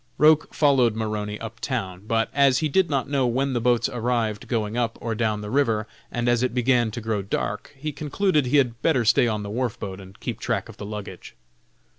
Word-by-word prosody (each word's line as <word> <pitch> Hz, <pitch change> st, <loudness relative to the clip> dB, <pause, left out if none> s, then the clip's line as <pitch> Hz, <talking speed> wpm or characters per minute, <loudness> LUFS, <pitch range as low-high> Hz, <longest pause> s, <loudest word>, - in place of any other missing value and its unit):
Roch 155 Hz, +1 st, +5 dB
followed 130 Hz, -7 st, +3 dB
Maroney 105 Hz, -1 st, -3 dB
up -, -, -8 dB
town, 95 Hz, +1 st, -4 dB
but, 115 Hz, 0 st, +1 dB
as 140 Hz, -2 st, +4 dB
he 155 Hz, -, +1 dB
did 185 Hz, +5 st, +2 dB
not 135 Hz, -4 st, 0 dB
know 135 Hz, -2 st, +1 dB
when 130 Hz, +3 st, 0 dB
the 120 Hz, -, 0 dB
boats 120 Hz, 0 st, +3 dB
arrived 115 Hz, -3 st, -1 dB
going 110 Hz, -3 st, -1 dB
up 120 Hz, -2 st, -1 dB
or 115 Hz, -1 st, -3 dB
down 110 Hz, -1 st, 0 dB
the 105 Hz, 0 st, -6 dB
river, 115 Hz, -6 st, +2 dB, 0.3 s
and 120 Hz, 0 st, -1 dB
as 120 Hz, -1 st, +3 dB
it 125 Hz, -1 st, 0 dB
began 125 Hz, -2 st, +3 dB
to 110 Hz, -, -5 dB
grow 110 Hz, -2 st, -1 dB
dark, 100 Hz, +1 st, -3 dB
he 150 Hz, +3 st, -4 dB
concluded 150 Hz, +1 st, 0 dB
he 145 Hz, -, +3 dB
had 120 Hz, -4 st, +1 dB
better 130 Hz, -8 st, +2 dB
stay 120 Hz, -, +4 dB
on 105 Hz, -2 st, -1 dB
the 100 Hz, -, -6 dB
wharf 120 Hz, +1 st, -2 dB
boat 95 Hz, -1 st, -6 dB
and 95 Hz, 0 st, -14 dB
keep -, -, -4 dB
track -, -, -1 dB
of -, -, -12 dB
the 100 Hz, -, -7 dB
luggage. 105 Hz, -3 st, -8 dB
120 Hz, 220 wpm, -24 LUFS, 105-135 Hz, 0.3 s, Roch